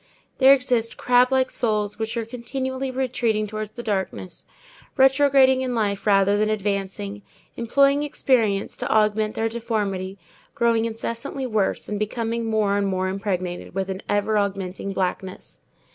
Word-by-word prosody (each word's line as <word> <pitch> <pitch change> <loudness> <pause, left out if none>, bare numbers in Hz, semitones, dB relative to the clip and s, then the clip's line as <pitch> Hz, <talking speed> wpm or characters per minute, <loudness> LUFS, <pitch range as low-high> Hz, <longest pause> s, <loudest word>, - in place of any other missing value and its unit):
There 265 0 +8
exist 250 -4 +2
crab 250 +1 +3
like 260 -1 +2
souls 210 -2 -1
which 225 +1 -3
are 230 - -2
continually 260 +3 -4
retreating 245 -4 0
towards 215 0 -5
the 240 +2 -9
darkness, 190 -4 -4 0.5
retrograding 265 -1 +5
in 255 -2 -2
life 205 -2 -1
rather 200 0 +4
than 215 0 +2
advancing, 200 -1 -3 0.3
employing 275 +4 +3
experience 230 -8 +1
to - - -4
augment 215 0 +2
their 225 - 0
deformity, 205 -5 -3 0.4
growing 230 -1 +2
incessantly 230 +4 -4
worse, 215 -5 -1
and 210 -1 -3
becoming 230 +2 -2
more 215 -2 +1
and 200 - 0
more 185 -1 -1
impregnated 185 -3 -4
with 195 0 -2
an 190 +1 -5
ever 210 +1 +1
augmenting 195 -1 -3
blackness. 190 0 -4
220 Hz, 145 wpm, -23 LUFS, 200-245 Hz, 0.5 s, There